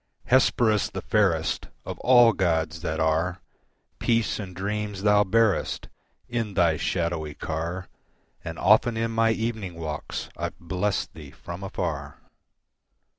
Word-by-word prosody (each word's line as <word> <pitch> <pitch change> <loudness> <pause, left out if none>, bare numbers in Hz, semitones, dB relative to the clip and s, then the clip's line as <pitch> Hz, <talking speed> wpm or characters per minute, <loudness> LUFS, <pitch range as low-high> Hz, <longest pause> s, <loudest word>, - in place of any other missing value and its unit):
Hesperus 120 -4 +3
the - - -6
fairest 90 -7 +1 0.2
Of - - -6
all 120 -2 +6
gods 80 -3 0
that 80 -2 -2
are, 80 +3 +1 0.6
Peace 115 -2 +1
and 95 -4 -7
dreams 105 +1 -3
thou 105 0 +5
bearest 110 0 +1 0.4
In 115 -5 -3
thy 85 -4 +4
shadowy 85 -4 -2
car, 85 +4 -4 0.6
And 80 0 -6
often 110 +4 +4
in 115 0 0
my 115 0 +3
evening 110 -5 -2
walks 80 -3 -5
I've - - -4
blessed 95 +4 -2
thee 75 -3 -10
from 85 +5 -9
afar. 80 -8 -4
95 Hz, 125 wpm, -26 LUFS, 80-110 Hz, 0.6 s, all